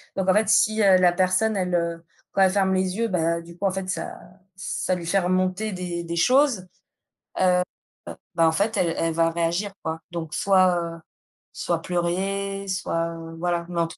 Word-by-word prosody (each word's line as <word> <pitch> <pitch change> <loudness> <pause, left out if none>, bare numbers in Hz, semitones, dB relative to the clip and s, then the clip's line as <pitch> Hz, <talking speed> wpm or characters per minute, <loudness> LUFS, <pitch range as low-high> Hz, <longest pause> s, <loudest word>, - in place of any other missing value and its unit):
Donc 190 -1 0
en - - +6
fait 215 +1 +2
si, 215 0 +4
heu, 190 -2 +6
la 180 -1 +5
personne 190 +4 +1
elle, 180 -1 -1
heu 170 -1 -2 0.3
quand 195 - +2
elle 190 -1 +5
ferme 190 -1 +2
les 185 0 0
yeux, 230 0 +1
bah, 170 -2 0
du 170 +1 -13
coup 200 - -3
en 195 - +3
fait 190 0 -4
ça 165 -3 -4 0.4
ça 185 0 -2
lui 175 -2 -6
fait 195 +3 +3
remonter 185 +3 0
des 175 -1 -4
des 170 0 -4
choses. 250 -2 +3 0.7
Heu, 180 -1 +4 0.7
bah, 165 -1 +4
en - - +4
fait 205 +6 0
elle 170 -2 +1
elle 165 0 0
va 165 0 +2
réagir 170 +4 -1
quoi. 160 0 -3
Donc 165 -2 -5
soit, 185 -2 +4 0.2
heu, 165 - -13 0.5
soit 170 -2 -2
pleurer 195 +3 -2
soit 165 -3 -2 0.2
voilà, 175 0 -1
mais 170 -1 -1
en 165 - +1
tout 165 - -12
185 Hz, 200 wpm, -24 LUFS, 170-195 Hz, 0.7 s, en